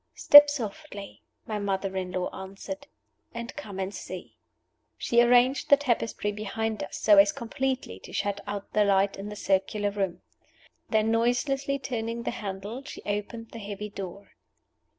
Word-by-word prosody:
"Step 290 0 +9
softly," 235 -4 -6 0.2
my 215 -1 -3
mother 195 -1 -2
in 185 -1 -3
law 180 0 -1
answered, 195 +10 -7 0.5
"and 235 +1 -6
come 210 -10 -7
and 190 +1 -3
see." - - -8 0.6
She 235 0 +3
arranged 245 +2 +4
the 285 - +8
tapestry 235 -6 -1
behind 215 +1 -3
us - - -5
so 205 -2 +6
as 200 0 +6
completely 255 - -3
to - - -12
shut 200 0 -2
out 200 -1 -5
the 210 - +4
light 195 0 +3
in 200 +1 -6
the 210 - -7
circular 200 +1 0
room. 195 -3 -3 0.7
Then 220 0 +2
noiselessly 270 +4 +1
turning 235 -3 -4
the - - -1
handle, 210 +2 -6
she 285 - -9
opened 210 +3 -4
the 230 - -8
heavy 205 0 -6
door. 200 0 -8
210 Hz, 155 wpm, -27 LUFS, 200-240 Hz, 0.7 s, Step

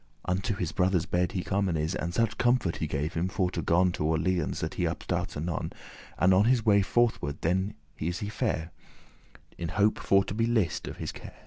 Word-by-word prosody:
Unto 95 +3 -1
his 90 -4 -2
brother's 90 -2 +1
bed 90 +2 0
he 90 -3 -2
comen 95 -4 0
is, 80 +3 -1
And 85 - -2
such 115 +3 0
comfort 120 -8 +2
he 80 - -2
gave 75 +1 -2
him, 85 +2 0
for 95 -1 0
to - - -2
gon 90 +2 +3
To 75 - -2
Orleans, 85 +3 0
that - - -2
he - - 0
upstart - - -3
anon, 80 +2 -3 0.5
And 95 +2 +4
on 95 +3 +5
his 120 -2 +3
way 100 -2 +5
forth 120 +4 +2
ward 70 +1 -3
then 95 +5 0 0.2
is 85 +3 -2
he 100 - -4
fare,* 95 -8 -2 0.6
*gone - - -19 0.2
In 85 - -2
hope 105 +5 +2
for 100 0 +4
to 100 - -5
be 115 +2 +1
lissed* 110 -8 0
of - - -6
his - - -4
care. - - -11
95 Hz, 220 wpm, -28 LUFS, 85-105 Hz, 0.6 s, on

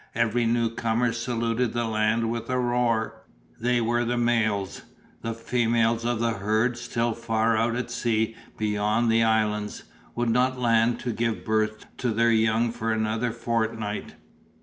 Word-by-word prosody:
Every 115 +1 +1
newcomer 115 0 +1
saluted 115 0 -1
the 120 0 0
land 110 +1 +1
with 115 +3 -4
a 130 - +1
roar. 120 -2 0 0.4
They 120 +1 +2
were 120 +1 +1
the 120 +1 -1
males; 110 -5 0 0.4
the 115 0 -3
females 115 0 +1
of 120 -1 0
the 115 0 +1
herd, 110 +3 0
still 120 -1 -1
far 115 0 0
out 115 +2 +1
at 125 - -3
sea 110 -1 0 0.2
beyond 105 +2 +1
the 115 0 +4
islands, 105 -2 0 0.3
would 120 0 0
not 130 +2 +2
land 115 -1 +2
to 120 -2 -2
give 115 0 -2
birth 110 0 0
to 125 - -1
their 115 +1 +3
young 110 +1 +2
for 115 -1 -2
another 110 +2 0
fortnight. 110 -2 -2
115 Hz, 150 wpm, -26 LUFS, 110-120 Hz, 0.4 s, the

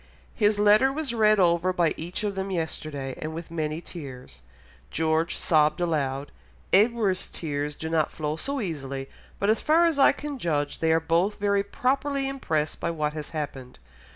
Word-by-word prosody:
His 210 -2 +2
letter 210 +6 +5
was 285 -3 -3
read 215 -2 +4
over 175 0 +3
by 175 -3 +2
each 175 +6 -5
of 205 -1 -1
them 195 0 -3
yesterday 155 -6 -3
and 155 +1 -4
with 165 0 -7
many 155 -1 -2
tears; 130 - -10 0.5
George 160 +1 0
sobbed 155 0 +2
aloud, 145 -5 -1 0.4
Edward's 210 -2 +3
tears 145 -2 -3
do 160 - -5
not 160 -1 +1
flow 150 -1 -3
so 275 - -3
easily, 135 - -4 0.3
but 200 +2 +2
as 220 - 0
far 325 +3 +4
as 325 -4 +1
I 275 - +7
can 290 -2 -6
judge, 145 -6 -1
they 160 0 +2
are 160 - +4
both 170 +5 +1
very 200 0 +2
properly 270 +6 0
impressed 160 - -2
by 170 - -1
what 155 -2 -1
has 150 -1 -6
happened.... 140 -5 -6
170 Hz, 175 wpm, -26 LUFS, 150-210 Hz, 0.5 s, I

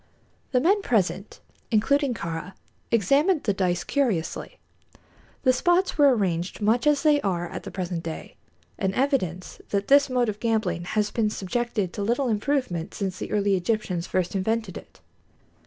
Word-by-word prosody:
The 255 - +3
men 390 +9 +3
present, 200 - -1 0.3
including 265 +4 +2
Kāra, 170 +2 -5 0.4
examined 280 - +3
the 205 - +1
dice 180 -2 0
curiously. 230 - -1 0.9
The 255 -2 +5
spots 350 +8 +2
were 285 -4 +5
arranged 180 -3 -1
much 225 +6 +2
as 295 0 +3
they 300 -2 +4
are 175 -3 -1
at - - -6
the - - -8
present 180 -3 -4
day, 165 -1 -7 0.4
an 190 -1 -1
evidence 245 - -1
that 200 0 -1
this 280 0 +6
mode 250 -2 +1
of 210 -1 -3
gambling 220 -6 0
has 210 +3 0
been 220 -2 +1
subjected 210 -1 -2
to 205 - -4
little 240 +5 0
improvement 215 - -1
since 190 -2 -3
the - - -5
early 200 -1 +2
Egyptians 185 -2 -1
first 185 0 -1
invented 215 0 -1
it. - - -12
215 Hz, 155 wpm, -25 LUFS, 185-260 Hz, 0.9 s, this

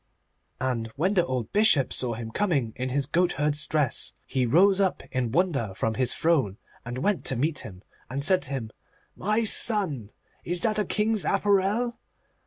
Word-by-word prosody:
And 125 -3 -2
when 180 +8 +1
the 180 -4 +3
old 125 -8 -4
Bishop 200 - +3
saw 120 -3 +2
him 115 0 -7
coming 140 - 0
in 130 +1 -3
his 140 +2 0
goatherd's 150 -2 0
dress, 150 -5 -1
he 130 -2 -1
rose 190 +9 +4
up 190 -2 0
in 125 -3 -1
wonder 140 - 0
from 110 +3 -1
his 130 +2 +1
throne, 135 - +1 0.3
and 120 +1 -6
went 200 +7 0
to 130 - -1
meet 145 +3 -1
him, 95 -3 -10 0.3
and 140 +3 -3
said 185 +4 +3
to 140 - -8
him, 125 -6 -4 0.4
'My 215 +4 0
son, 190 - +2 0.3
is 175 0 -1
this 215 -2 +1
a 210 - +1
king's 215 +2 0
apparel? 205 +4 +1
150 Hz, 175 wpm, -26 LUFS, 125-195 Hz, 0.4 s, rose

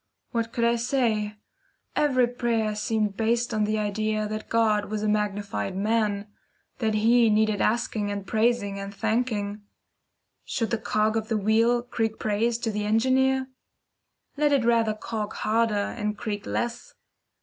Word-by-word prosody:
What 230 -1 -1
could 235 - -1
I 235 0 +3
say? 230 -4 0 0.6
Every 260 -4 +3
prayer 235 -3 -1
seemed 210 -1 -1
based 235 +2 0
on 215 -1 +1
the 215 +1 0
idea 215 +1 -1
that 215 0 -5
God 215 -2 +2
was 215 0 -3
a - - +1
magnified 205 - -1
man 210 0 0 0.5
that 220 -2 0
He 230 +2 +4
needed 215 -1 +2
asking 215 -2 0
and 200 -1 -4
praising 220 -3 +1
and 195 0 -5
thanking. 215 -2 -1 0.8
Should 225 -4 -2
the 230 - 0
cog 215 0 +1
of 220 -1 -1
the 220 -1 0
wheel 225 +3 +3
creak 225 -3 -2
praise 225 +2 0
to 225 - 0
the 210 0 -2
Engineer? 260 +5 +2 0.9
Let 295 0 +3
it 275 -5 +3
rather 230 -2 +3
cog 215 -1 -4
harder, 225 0 +1 0.2
and 210 -2 -3
creak 210 -3 -4
less. 240 0 -3
220 Hz, 150 wpm, -26 LUFS, 210-235 Hz, 0.9 s, He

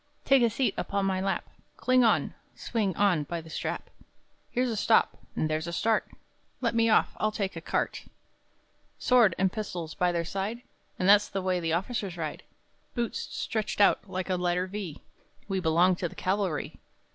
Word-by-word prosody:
Take 270 -1 +5
a 235 - +4
seat 245 +4 0
upon 200 -1 -1
my 190 -1 0
lap, 195 - -1 0.3
Cling 255 0 +3
on, 225 - +2 0.2
swing 205 -6 -1
on 195 -6 +3
by 170 +3 -4
the 160 -1 -11
strap; - - -4 0.6
Here 250 - 0
a 240 -3 -1
stop, 220 +2 +3 0.2
and 155 - 0
there 155 0 0
a 165 +2 -5
start 220 +5 +1 0.5
Let 235 -3 0
me 230 0 +3
off, 215 - +3
I'll 215 - +1
take 200 -3 -3
a 165 - -6
cart! - - -1
[Boisterously] - - -20 0.9
Sword 235 -8 +4
and 190 -1 +2
pistols 175 -7 -4
by 180 0 +1
their 170 -1 -1
side, 200 +7 -3 0.3
And 185 - 0
that's 205 +1 +6
the 195 -1 -3
way 185 -1 +1
the 165 -2 -1
officers 195 0 -2
ride! 155 -3 -4 0.5
Boots 240 -2 -1
stretched 215 -3 -3
out 200 0 +4
like 185 0 -3
a 185 - +1
letter 180 0 0
V, 190 -5 -6 0.5
we 195 -2 -1
belong 175 +2 +3
to 175 - -2
the - - -14
cavalry! 185 -5 -1
195 Hz, 185 wpm, -28 LUFS, 175-215 Hz, 0.9 s, that's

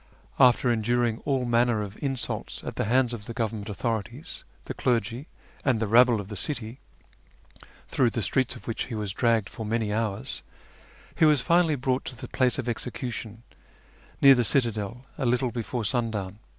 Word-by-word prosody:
After 125 -1 +5
enduring 120 0 +1
all 135 -3 +1
manner 120 -2 +2
of 100 0 -8
insults 135 -3 -2
at - - -5
the - - -1
hands 125 +2 +2
of 110 -3 -7
the 115 - -6
Government 110 -3 -2
authorities, 110 -1 -4 0.2
the - - -4
clergy, 120 +3 -1 0.4
and 130 -5 +2
the 110 - 0
rabble 120 +1 +5
of 100 - -6
the 105 - -7
city, 115 - -5 1.1
through 125 -3 +2
the 115 -1 -3
streets 130 +2 +1
of - - -12
which 115 - -2
he 120 - -6
was 105 -3 -3
dragged 115 -2 +2
for 110 - -7
many 110 -1 -1
hours, 110 -3 -2 0.7
he 160 - +4
was 150 -4 +5
finally 170 +2 +3
brought 130 0 0
to 130 - -6
the 120 - -8
place 125 -2 +2
of 130 - -3
execution, 115 -2 -4 0.8
near 140 0 +10
the 125 -2 +2
citadel, 115 -1 -1
a 135 - 0
little 125 +1 +1
before 120 -1 -3
sundown. 105 -4 -2
120 Hz, 175 wpm, -27 LUFS, 110-125 Hz, 1.1 s, near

